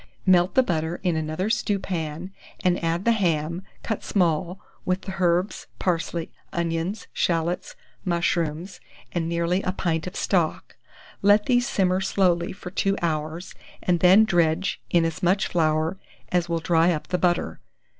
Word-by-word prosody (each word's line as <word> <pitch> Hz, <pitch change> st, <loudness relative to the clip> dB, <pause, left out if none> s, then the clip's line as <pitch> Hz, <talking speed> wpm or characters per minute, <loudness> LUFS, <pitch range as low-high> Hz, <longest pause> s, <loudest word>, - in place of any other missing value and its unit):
Melt 180 Hz, -1 st, +4 dB
the 260 Hz, -, +6 dB
butter 165 Hz, -4 st, -2 dB
in 180 Hz, -3 st, +1 dB
another 155 Hz, +4 st, -2 dB
stewpan, 185 Hz, -6 st, -2 dB, 0.3 s
and 180 Hz, -1 st, +1 dB
add 165 Hz, +3 st, 0 dB
the 235 Hz, -, +5 dB
ham, 170 Hz, -5 st, 0 dB, 0.2 s
cut 220 Hz, -, -3 dB
small, 175 Hz, 0 st, 0 dB, 0.2 s
with 185 Hz, +1 st, 0 dB
the 190 Hz, -, -6 dB
herbs, 180 Hz, +2 st, +1 dB
parsley, 170 Hz, -2 st, -1 dB, 0.2 s
onions, 170 Hz, +4 st, -2 dB
shallots, 175 Hz, -, -1 dB, 0.3 s
mushrooms, 170 Hz, 0 st, -1 dB, 0.3 s
and 165 Hz, -2 st, -2 dB
nearly 170 Hz, +2 st, 0 dB
a 185 Hz, -, -1 dB
pint 165 Hz, -3 st, -1 dB
of 180 Hz, -, -7 dB
stock; 175 Hz, -5 st, 0 dB, 0.5 s
let 205 Hz, +1 st, +5 dB
these 245 Hz, 0 st, +2 dB
simmer 185 Hz, -6 st, +1 dB
slowly 180 Hz, -3 st, +1 dB
for 180 Hz, -1 st, -9 dB
2 195 Hz, +1 st, 0 dB
hours, 160 Hz, +1 st, -2 dB, 0.3 s
and 175 Hz, -1 st, +2 dB
then 190 Hz, +5 st, +7 dB
dredge 175 Hz, -1 st, +1 dB
in 170 Hz, -1 st, +3 dB
as 165 Hz, +1 st, -3 dB
much 185 Hz, +2 st, +2 dB
flour 160 Hz, +2 st, 0 dB, 0.3 s
as 175 Hz, -1 st, +1 dB
will 170 Hz, -, +1 dB
dry 165 Hz, +1 st, +3 dB
up 155 Hz, -3 st, -4 dB
the 180 Hz, -1 st, 0 dB
butter. 175 Hz, -, 0 dB
175 Hz, 150 wpm, -24 LUFS, 165-190 Hz, 0.5 s, then